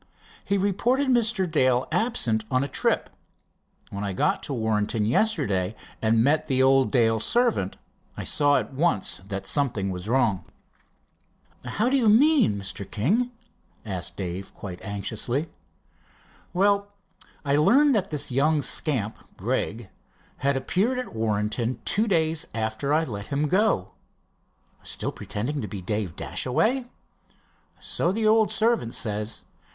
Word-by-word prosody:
He 200 - 0
reported 235 +8 +1
Mr. 230 -5 +2
Dale 130 -7 +2
was - - -10
absent 120 - 0
on 130 +1 +1
a - - -2
trip. - - 0 0.8
When 100 0 -4
I 100 -2 -2
got - - +1
to - - -5
Warrenton 110 -2 0
yesterday 110 - +1 0.3
and 115 0 +3
met 150 +4 +2
the 130 -2 +2
old 135 0 +4
Dale 115 -4 +3
servant, 235 - +1 0.4
I - - -4
saw 145 -1 +3
at - - -3
once 135 - 0
that 100 -1 -4
something 115 -8 0
was 90 +3 -6
wrong." 115 -7 +1 1.2
"How 220 - -1
do 270 +2 +3
you 235 -5 +3
mean, 255 - +5
Mr. 100 +1 -5
King?" 210 - +1 0.6
asked 90 -3 -3
Dave 95 0 -5
quite 90 -3 -8
anxiously. 110 +8 -3 1.0
"Well, 200 +2 +2 0.6
I 140 0 +2
learned 275 - +5
that 195 -4 0
this 150 -3 -2
young 145 +3 +2
scamp, 125 -6 +1 0.2
Gregg, 110 -1 -2 0.5
had 140 0 +1
appeared 195 - 0
at 255 - -5
Warrenton 110 +2 -1
two 215 +3 +2
days 160 -4 +1
after 110 +5 -2
I 155 +2 +3
let 105 -8 -6
him 145 +2 0
go." 190 - +1 0.9
"Still - - -2
pretending 135 +8 -4
to 105 - -4
be 100 +1 -6
Dave 100 -2 -3
Dashaway?" 235 - 0 0.9
"So 170 - 0
the 220 +3 -1
old 220 0 +4
servant 225 - +1
says. 105 -3 -3
135 Hz, 140 wpm, -25 LUFS, -, 1.2 s, mean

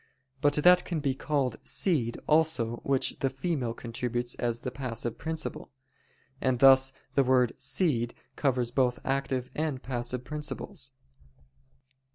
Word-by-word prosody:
But 145 -1 +4
that 180 +4 +6
can 170 -3 -3
be 140 -2 0
called 135 -2 -1
seed 135 - 0
also 155 -7 +2
which 135 +1 0
the 135 - +1
female 135 -4 -2
contributes 120 +1 -3
as 120 -1 -2
the 125 - -4
passive 120 -3 -4
principle. 160 0 -4 0.7
And 130 -1 +2
thus 135 +1 +7 0.2
the 140 - +4
word 125 -2 +3
"seed" 120 -10 0 0.2
covers 125 -4 0
both 125 -1 +2
active 135 -1 -1
and 150 -4 -2
passive 125 0 -3
principles. 150 +2 -3
130 Hz, 130 wpm, -29 LUFS, 120-150 Hz, 0.7 s, thus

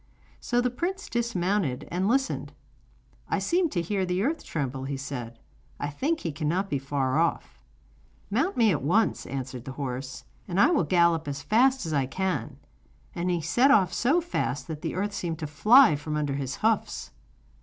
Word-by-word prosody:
So 245 0 0
the 250 0 0
prince 375 +9 -3
dismounted 190 - -1
and 180 +3 0
listened. 265 +4 0 0.8
'I - - +1
seem 345 -1 +1
to 175 -10 -1
hear 195 +2 -1
the 180 +1 0
earth 315 +6 -1
tremble,' 135 -3 -3
he 140 0 -3
said; 125 -4 -6 0.4
'I 145 - -2
think 300 - -1
he 165 - -2
cannot 165 +6 -1
be 140 - 0
very 135 - -19
far 140 0 +1
off.' 170 0 -1 0.7
'Mount 385 - 0
me 225 -3 +5
at 150 - 0
once,' 185 - +1
answered 130 -2 -5
the 135 - -6
horse, 130 -1 -5 0.2
'and 185 0 -1
I 290 - +6
will 330 - +2
gallop 170 -3 +3
as 140 0 -4
fast 255 +1 +3
as 160 - -3
I 135 -3 +1
can.' 190 +6 -2 0.6
And 175 0 -2
he 175 -2 0
set 240 - +3
off 190 -10 +4
so 285 - +2
fast 320 - -2
that 155 -2 -5
the - - -3
earth 205 +2 -2
seemed 170 -4 -3
to 155 - -5
fly 215 - +6
from 150 +1 -4
under 145 -2 -1
his 135 -1 -3
hoofs. 215 - 0
175 Hz, 185 wpm, -27 LUFS, 140-230 Hz, 0.8 s, I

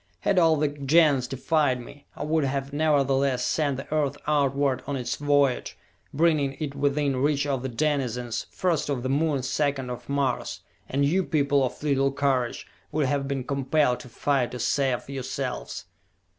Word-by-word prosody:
Had 195 -2 +3
all 165 -2 +5
the 150 0 +1
Gens 145 -1 +3
defied 135 -1 +1
me, 140 +4 -12
I - - -5
would 155 +1 +1
have 135 +1 -2
nevertheless 140 -4 +2
sent 145 -2 0
the 135 - -6
Earth 145 -2 0
outward 140 -3 +1
on 145 - -2
its 125 -2 -2
voyage, 145 -3 +1 0.3
bringing 150 -3 +2
it 150 -3 -3
within 140 -1 0
reach 145 +1 +1
of 135 -3 -1
the 130 - -3
denizens, 125 -3 -1
first 175 -5 -1
of 130 -4 -1
the 130 - -2
Moon, 145 -1 +1
second 135 -1 -1
of 125 - -8
Mars 140 -3 -1 0.3
and 140 +1 +1
you 185 +7 +2
people 145 -4 +2
of 130 - -4
little 135 -2 +2
courage 135 -3 0 0.3
would 150 -2 +1
have 140 0 0
been 135 -2 -2
compelled 140 -1 +1
to 125 - -11
fight 130 +1 0
to 125 - -5
save 135 -3 0
yourselves!" 130 -1 -4
140 Hz, 170 wpm, -26 LUFS, 130-145 Hz, 0.3 s, all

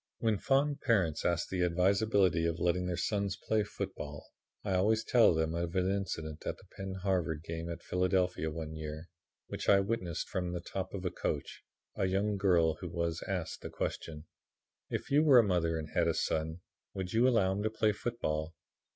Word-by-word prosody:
"When 110 -3 +1
fond 140 +1 +2
parents 95 - +2
ask 85 -1 0
the 95 -1 -1
advisability 90 0 +3
of 85 -1 -1
letting 90 +1 +1
their 90 -1 -2
sons 100 +1 -1
play 110 -1 +1
football, 95 -8 -6 0.4
I 100 - -1
always 110 +4 +3
tell 115 -7 +5
them 80 0 0
of 85 +1 -2
an 95 0 +2
incident 80 -6 -3
at - - -2
the - - -18
Penn 95 -1 -5
Harvard 85 -5 0
game 80 0 -5
at 85 0 -6
Philadelphia, 90 -2 +1
one 80 0 -5
year, 80 +1 -6 0.4
which - - -4
I 100 - +7
witnessed 95 -4 -2
from 90 -2 -2
the 90 - -2
top 95 +2 -5
of 95 -1 -5
a 90 - 0
coach. - - -3 0.4
A 95 - +1
young 100 +2 +1
girl 85 -5 +3
was 85 -2 -2
asked 95 -5 -3
the - - -6
question: 75 -1 -4 0.6
"'If - - -4
you 145 +2 +6
were 145 -5 +7
a 120 - +8
mother 85 -5 +1
and 80 -1 -5
had 85 -1 +2
a 85 - +1
son, 80 +2 -1 0.3
would 95 -2 -4
you 115 +3 +5
allow 110 -7 +3
him 95 +2 -1
to 110 - +1
play 110 0 +2
football?' 85 -8 -3
90 Hz, 190 wpm, -32 LUFS, 85-100 Hz, 0.6 s, a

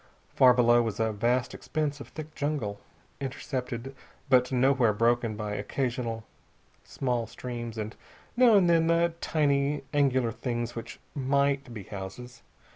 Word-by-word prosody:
Far 125 -1 +6
below 120 -1 +5
was 115 -3 -3
a 110 0 +1
vast 120 +5 0
expanse 150 -2 -3
of - - -9
thick 155 0 -9
jungle, 140 -10 -2 0.4
intercepted 130 -1 -4 0.3
but 125 -1 +4
nowhere 125 -3 +3
broken 115 0 +1
by 105 -1 -4
occasional 115 +1 -2 0.6
small 120 -4 -2
streams 120 -1 -6
and 110 0 -4 0.4
now 240 -3 +6
and 190 -3 +5
then 165 -1 +4
the 170 0 +3
tiny, 140 -2 +1
angular 130 -5 +2
things 120 0 -3
which 115 - -7
might 140 -1 +1
be 110 -4 -7
houses. 100 +7 -8
125 Hz, 135 wpm, -28 LUFS, 115-140 Hz, 0.6 s, Far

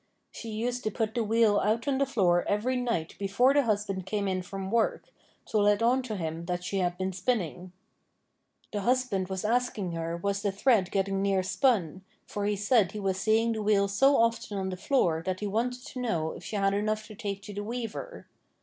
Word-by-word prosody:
She 230 - -8
used 240 +3 -2
to - - +2
put 220 +1 -2
the 235 - 0
wheel 220 -1 +3
out 225 +6 0
on 270 -1 +1
the 275 - +2
floor 180 -8 +2
every 215 +6 0
night 230 -10 -1
before 205 +7 +3
the 285 - +5
husband 205 -5 -1
came 205 -1 -1
in 185 -1 0
from 195 +1 -6
work, 230 -1 0 0.3
to 215 - 0
let 205 +2 +3
on 250 +3 +3
to 240 -4 -5
him 165 -2 -4
that 180 0 -3
she 195 +2 -2
had 175 -1 0
been 190 0 -2
spinning. 180 -3 -2 1.0
The 205 - -1
husband 240 -5 +1
was 190 +1 -4
asking 225 -5 0
her 165 0 -3
was 200 +3 -1
the 205 -2 0
thread 200 -2 +2
getting 195 0 0
near 195 -1 +2
spun, 190 - +1 0.2
for 205 -1 -4
he 205 0 +1
said 210 -1 +2
he 210 - -4
was 190 -2 -1
seeing 225 +3 +2
the 220 -1 -2
wheel 205 -1 +3
so 270 +8 +4
often 230 -3 +1
on 190 -1 -2
the 185 - -3
floor 180 - +1
that 185 0 -2
he 210 - -3
wanted 245 +5 -2
to 265 - -7
know 165 -10 -1
if - - -10
she - - -6
had 195 -1 +2
enough 215 +1 -1
to 215 - -11
take 200 -1 -5
to 205 - -8
the 205 +1 -4
weaver. 235 - -5
205 Hz, 215 wpm, -28 LUFS, 190-230 Hz, 1.0 s, the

